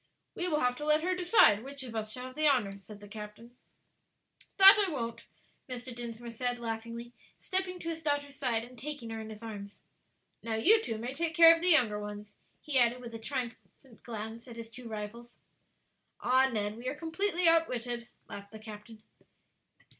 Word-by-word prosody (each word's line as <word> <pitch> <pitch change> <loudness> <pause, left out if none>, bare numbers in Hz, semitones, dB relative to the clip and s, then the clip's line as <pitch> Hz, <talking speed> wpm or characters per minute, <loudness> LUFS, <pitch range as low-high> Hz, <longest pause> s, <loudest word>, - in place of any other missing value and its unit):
"We 355 - -3
will 305 -3 0
have 250 0 +1
to 295 - -6
let 305 +1 +3
her 370 +1 +1
decide 355 - +5
which 275 0 -5
of 235 -3 -8
us 215 -1 -3
shall 250 +2 -5
have 255 0 -10
the 310 0 +2
honor," 210 -8 +1
said 205 +2 -13
the 205 - -11
captain. 210 +3 -10 1.0
"That 390 +2 +10
I - - -3
won't," 235 -6 -5 0.4
Mr. 250 0 -6
Dinsmore 235 0 -7
said, 245 +1 -2
laughingly, 230 +1 -6 0.2
stepping 370 -1 -3
to 335 - -6
his 325 -1 -5
daughter's 290 -2 -2
side 240 -5 -1
and 245 0 -13
taking 280 -5 -6
her 225 - -5
in 220 0 -8
his 215 +1 -10
arms. 205 -2 -9 0.6
"Now, 225 -1 -3
you 425 - +5
two 225 - -3
may 240 +4 -5
take 330 +3 -2
care 330 -1 +9
of 330 - -7
the 360 - +4
younger 240 -11 +4
ones," 205 0 -8 0.3
he 280 -4 +1
added, 240 0 +3
with 240 -2 -9
a 225 - -6
triumphant 245 0 -7
glance 225 +1 -7
at 235 -1 -10
his 230 -1 -8
two 245 +1 -10
rivals. 220 +3 -8 0.8
"Ah, 260 +1 +3
Ned, 210 -1 -2
we 240 +2 -7
are 270 - -2
completely 345 +3 0
outwitted," 245 -8 +1 0.2
laughed 200 0 -9
the - - -8
captain. 215 0 -12
240 Hz, 190 wpm, -30 LUFS, 220-295 Hz, 1.0 s, That